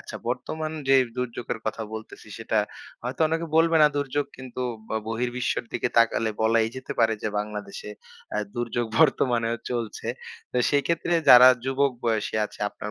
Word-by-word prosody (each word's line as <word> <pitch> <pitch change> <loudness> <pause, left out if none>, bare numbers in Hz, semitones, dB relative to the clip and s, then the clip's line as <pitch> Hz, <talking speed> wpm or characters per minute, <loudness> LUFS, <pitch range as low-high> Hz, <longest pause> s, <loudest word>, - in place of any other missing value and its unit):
আচ্ছা - - -8
বর্তমান 155 0 -3 0.2
যে 135 - +6 0.2
দুর্যোগের 120 -1 -3
কথা 110 +1 -2
বলতেছি 110 0 -9
সেটা 110 -1 0 0.4
হয়তো 125 +5 -5
অনেকে 165 +1 -1
বলবে 165 0 +4
না 150 - +9
দুর্যোগ 145 0 -1
কিন্তু 130 -1 -8 0.3
ব - - -20 0.2
বহির্বিশ্বের 120 +2 -1
দিকে 125 - 0
তাকালে 115 -1 +3
বলাই 110 0 +3
যেতে 130 - -5
পারে 110 -1 +4
যে - - 0
বাংলাদেশে 105 -1 -6 0.4
অ্যা - - -2 0.2
দুর্যোগ 120 0 -1
বর্তমানেও 120 -6 +3
চলছে। 115 -2 -4 0.4
তো - - -3
সেক্ষেত্রে 165 +4 +1
যারা 125 +1 +10 0.2
যুবক 135 +1 +1
বয়সী 110 -2 0
আছে - - -9
আপনার 105 - -8
120 Hz, 155 wpm, -25 LUFS, 115-135 Hz, 0.4 s, যারা